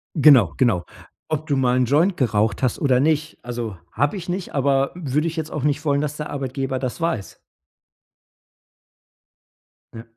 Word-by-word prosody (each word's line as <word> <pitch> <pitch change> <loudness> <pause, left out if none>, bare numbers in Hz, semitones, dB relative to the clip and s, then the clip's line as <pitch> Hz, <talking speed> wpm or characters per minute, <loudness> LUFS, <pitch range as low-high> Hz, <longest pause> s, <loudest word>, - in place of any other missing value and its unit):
Genau, 135 - +6
genau. 110 -9 +2 0.4
Ob 155 0 -3
du 145 - +1
mal 125 -2 +2
'n 130 - +3
Joint 165 - +2
geraucht 110 -3 +1
hast 130 - +1
oder 130 -4 +3
nicht. 155 +1 0
Also, 120 -5 -5
habe 145 +7 0
ich 180 -1 -8
nicht. 180 +1 -4
Aber 140 -1 +2
würde 150 -2 -1
ich 165 - -4
jetzt 160 -1 -4
auch 150 - -4
nicht 145 0 0
wollen, 140 -1 +2
dass 150 0 -3
der 150 0 -5
Arbeitgeber 135 -1 -3
das 130 +4 -4
weiß. 165 -12 -2 2.5
Ja. 115 - -8
140 Hz, 165 wpm, -22 LUFS, 125-155 Hz, 2.5 s, Genau